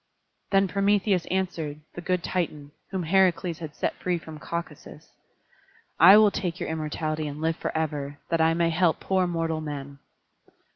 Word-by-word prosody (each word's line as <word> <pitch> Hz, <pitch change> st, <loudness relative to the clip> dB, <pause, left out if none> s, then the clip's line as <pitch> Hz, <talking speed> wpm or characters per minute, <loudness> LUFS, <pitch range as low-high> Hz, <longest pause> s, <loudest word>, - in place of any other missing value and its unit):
Then 195 Hz, 0 st, +3 dB
Prometheus 200 Hz, -1 st, +1 dB
answered, 170 Hz, -6 st, -2 dB
the 175 Hz, -, -7 dB
good 180 Hz, 0 st, -1 dB
Titan, 150 Hz, -5 st, -3 dB, 0.2 s
whom 190 Hz, -2 st, -3 dB
Heracles 180 Hz, -1 st, +2 dB
had 155 Hz, -3 st, -7 dB
set -, -, -1 dB
free 180 Hz, -1 st, 0 dB
from 160 Hz, -2 st, -10 dB
Caucasus: 170 Hz, -2 st, -7 dB, 0.9 s
"I 190 Hz, +5 st, +10 dB
will 215 Hz, -1 st, +6 dB
take 175 Hz, -4 st, -3 dB
your -, -, -3 dB
immortality 155 Hz, 0 st, -3 dB
and 145 Hz, 0 st, -6 dB
live 160 Hz, +1 st, 0 dB
forever, 145 Hz, -3 st, -3 dB
that 165 Hz, -1 st, +1 dB
I 165 Hz, 0 st, +3 dB
may 170 Hz, 0 st, +2 dB
help 165 Hz, 0 st, +2 dB
poor 190 Hz, -1 st, +1 dB
mortal 165 Hz, -2 st, -1 dB
men." 140 Hz, -2 st, -6 dB
165 Hz, 155 wpm, -26 LUFS, 155-185 Hz, 0.9 s, I